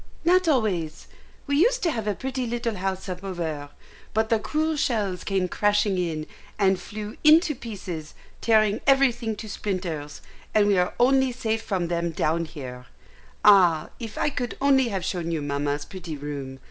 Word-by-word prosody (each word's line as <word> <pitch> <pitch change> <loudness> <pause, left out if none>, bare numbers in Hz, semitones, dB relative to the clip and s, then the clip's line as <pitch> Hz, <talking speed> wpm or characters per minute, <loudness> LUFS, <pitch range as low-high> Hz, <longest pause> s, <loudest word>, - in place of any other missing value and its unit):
"Not 365 +1 +4
always. 200 - 0 0.4
We 280 -1 +1
used - - +3
to 335 - +2
have 225 -6 -3
a 205 - 0
pretty 260 +1 -3
little 235 0 -2
house 190 0 -3
up 185 0 -5
over, 160 -6 -4 0.5
but 220 0 +2
the 225 - +3
cruel 310 +6 0
shells 205 - -1
came 190 -2 0
crashing 205 0 +1
in, 160 -3 -2 0.3
and 190 -2 +3
flew 210 0 -7
into 310 +1 +6
pieces, 190 - -7 0.3
tearing 215 -2 +3
everything 245 -5 +3
to 215 +1 -8
splinters, 180 -8 -4 0.3
and 210 -1 +5
we 200 -2 +3
are 180 - 0
only 265 +1 +4
safe 225 -2 -2
from 185 -6 -2
them 170 0 -1
down 165 +1 0
here. 125 -6 -9 0.6
Ah, 180 -6 +6
if 225 -3 -7
I 295 - +1
could 245 -3 -4
only 270 -2 +4
have 190 -5 -3
shown 175 -3 -2
you 165 -2 -1
Mamma's 145 0 -2
pretty 175 -5 -7
room! 140 -2 -6
200 Hz, 170 wpm, -25 LUFS, 170-240 Hz, 0.6 s, into